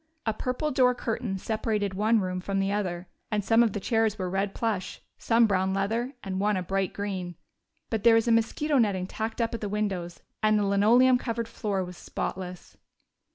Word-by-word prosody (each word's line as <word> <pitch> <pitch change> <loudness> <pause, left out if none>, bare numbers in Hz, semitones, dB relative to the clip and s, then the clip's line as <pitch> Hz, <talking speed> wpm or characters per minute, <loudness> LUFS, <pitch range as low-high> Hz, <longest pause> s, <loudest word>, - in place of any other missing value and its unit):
A 220 - +1
purple 255 +7 -2
door 255 -2 +4
curtain 225 -4 -3
separated 215 -1 -1
the 190 - -8
one 220 +2 +3
room 185 -1 -3
from 195 +1 -2
the 195 0 0
other, 185 -3 -2 0.2
and 210 -2 -1
some 225 +4 +5
of 230 -4 +2
the 205 - -2
chairs 225 +1 +1
were 185 -2 -3
red 195 +1 -1
plush, 215 -5 -2 0.2
some 230 0 +4
brown 190 -2 +1
leather, 230 +7 -1
and 190 -1 -3
one 205 0 +1
a 185 - -2
bright 195 +1 -1
green. 190 -4 -4 0.6
But 225 -3 -1
there 230 -1 +7
was 225 +1 +2
mosquito 235 +6 +2
netting 200 -5 +1
tacked 220 +4 -4
up 230 0 0
at 230 - -4
the 205 - -3
windows, 195 -4 -3 0.2
and 215 0 +4
the 205 - +1
linoleum 235 +6 +5
covered 230 -2 -3
floor 205 -4 -2
was 180 0 -10
spotless. 180 -1 -6
210 Hz, 200 wpm, -27 LUFS, 190-230 Hz, 0.6 s, there